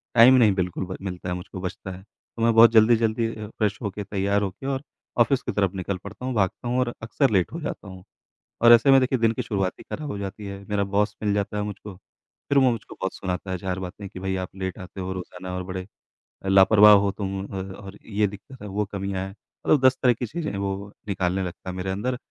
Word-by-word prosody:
Time 120 +2 +9
नहीं 110 -5 +5
बिल्कुल 90 0 -2
ब 95 - -6
मिलता 90 -2 -5
है, 90 - -1
मुझको 90 +1 -8
बचता 95 +1 -5
है 90 - -9
तो 115 +2 -14
मैं 115 - +4
बहुत 115 +1 +8
जल्दी-जल्दी 115 0 +4
अ, 105 -1 -7
फ्रेश 105 -1 -1
होके 105 -1 -4
तैयार 100 0 0
होके 100 +6 -4
और 135 0 -2 0.4
ऑफिस 120 +3 +4
की - - -3
तरफ 100 -2 +1
निकल 95 0 -3
पड़ता 105 +5 -8
हूँ, 130 - -2
भागता 105 +3 0
हूँ 125 +1 +1
और 120 -1 0
अक्सर 135 +4 +1
लेट 95 -4 +2
हो 165 - -5
जाता 105 - -5
हूँ 95 -1 -10 0.6
और 120 - +9
ऐसे 120 +4 +7
में 135 - +8
देखिए 130 0 +1
दिन 115 -1 +3
की 125 - -2
शुरुआत 95 -5 -1
ही - - -10
खराब 150 -2 -4
हो 100 - -4
जाती 100 +1 -6
है। 100 0 -7
मेरा 105 -1 +1
बॉस 100 +2 0
मिल 105 - +2
जाता 100 0 -1
है 105 - 0
मुझको 105 -1 -7 0.5
फिर 140 - +3
वो 130 -2 +5
मुझको 115 -3 -6
बहुत 95 - -1
सुनाता 95 0 -4
है 95 - -1
4 95 +1 -3
बातें 95 +2 -7
कि 90 - -9
भई 95 0 -2
आप 95 -1 -3
लेट 95 -1 -4
आते 95 +1 -8
हो 95 +1 -4
रोजाना 90 0 -7
और 90 - -3
बड़े 95 0 -5 0.6
लापरवाह 100 +2 +7
हो 100 -1 +4
तुम 95 -1 -4
अ, 95 -2 -5 0.2
और 100 0 -10
ये 105 -1 +1
दिक्कत 100 +6 -11
है 105 - -7
वो 105 +1 -1
कमियाँ 100 -1 -3
है 95 - -9
मतलब 130 +6 -1
10 130 0 +5
तरह 125 -2 +5
की 120 +2 -4
चीज़ें 155 +7 -4
हैं 100 - -4
वो 100 +1 -3 0.2
निकालने 95 -1 0
लगता 90 +1 -6
है 90 - -5
मेरे 95 +1 -3
अंदर। 125 +6 -2
100 Hz, 245 wpm, -25 LUFS, 95-115 Hz, 0.6 s, Time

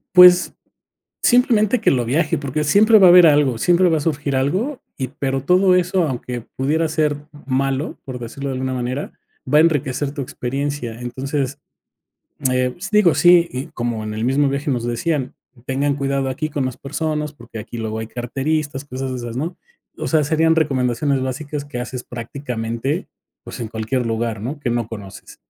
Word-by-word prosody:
Pues 180 0 +8 0.7
simplemente 240 -2 +3
que - - +4
lo 125 -3 +1
viaje, 160 +6 +1
porque 145 +2 -2
siempre 215 +9 +5
va 190 -3 +7
a - - +8
haber 180 -1 +9
algo, 145 -6 +3
siempre 175 +7 +3
va 160 - +2
a - - -1
surgir 145 -3 -1
algo, 195 - -1 0.2
y 130 -2 -3
pero 135 -2 -2
todo 185 +3 +4
eso, 180 0 +2
aunque 125 -2 -4
pudiera 155 +5 +1
ser 150 -2 0 0.3
malo, 135 +2 -1
por 130 -2 -6
decirlo 135 +4 -6
de - - -2
alguna 130 0 -2
manera, 125 +3 -3 0.4
va 150 - +7
a - - +8
enriquecer 145 -3 +1
tu 145 - -4
experiencia. 135 -2 -4
Entonces, 135 +3 -3 0.9
eh, 125 0 +1 0.2
digo, 200 -6 +5
sí, 175 -1 +5
y 130 +2 -4
como 120 -7 -3
en 105 - -4
el 110 +1 -3
mismo 135 +3 +2
viaje 140 +2 -1
nos 120 -2 -1
decían, 130 +3 -2 0.3
tengan 140 +2 0
cuidado 140 -1 -1
aquí 155 +4 -3
con 145 -2 -2
las 130 -2 -4
personas, 150 +1 -3
porque 120 -4 -10
aquí 120 +2 -8
luego 110 -1 -3
hay 110 - -5
carteristas, 135 +4 -3
cosas 130 -1 -5
de 130 - -3
esas, 120 -1 -6
¿no? 165 +7 -3 0.4
O - - -3
sea, 155 -2 +3
serían 160 +2 +2
recomendaciones 135 -2 +1
básicas 140 +3 -4
que 145 -4 -6
haces 125 0 -6
prácticamente, 120 +1 -4 0.3
pues, - - -9
en 115 - -3
cualquier 115 +3 -2
lugar, 115 -1 -2
¿no? 140 +6 -4
Que 120 - -1
no 120 -2 -1
conoces. 100 -4 -10
140 Hz, 180 wpm, -20 LUFS, 125-155 Hz, 0.9 s, haber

